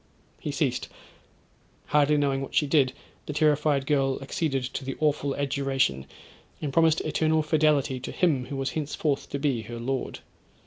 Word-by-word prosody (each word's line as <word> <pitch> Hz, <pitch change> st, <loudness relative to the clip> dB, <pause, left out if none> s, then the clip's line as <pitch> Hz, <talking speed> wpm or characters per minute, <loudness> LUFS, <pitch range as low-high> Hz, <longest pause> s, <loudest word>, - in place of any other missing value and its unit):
He -, -, -4 dB
ceased—hardly 150 Hz, 0 st, -2 dB
knowing 140 Hz, -2 st, +1 dB
what 135 Hz, -, -6 dB
she 150 Hz, -, +4 dB
did, 140 Hz, -3 st, +3 dB, 0.4 s
the 150 Hz, -, -3 dB
terrified 150 Hz, -2 st, +2 dB
girl 135 Hz, -2 st, +1 dB
acceded 135 Hz, -1 st, -1 dB
to 130 Hz, +2 st, -4 dB
the 135 Hz, 0 st, -5 dB
awful 145 Hz, -2 st, +1 dB
adjuration, 135 Hz, -, 0 dB, 0.5 s
and 145 Hz, -3 st, -4 dB
promised 160 Hz, 0 st, +4 dB
eternal 155 Hz, 0 st, +1 dB
fidelity 150 Hz, -4 st, +2 dB
to -, -, -6 dB
him 145 Hz, -8 st, +1 dB
who 140 Hz, -, -5 dB
was 135 Hz, 0 st, -1 dB
henceforth 150 Hz, -1 st, -2 dB
to -, -, -2 dB
be 140 Hz, -5 st, 0 dB
her 115 Hz, +2 st, -7 dB
lord. 130 Hz, +2 st, -3 dB
140 Hz, 150 wpm, -27 LUFS, 135-150 Hz, 0.5 s, she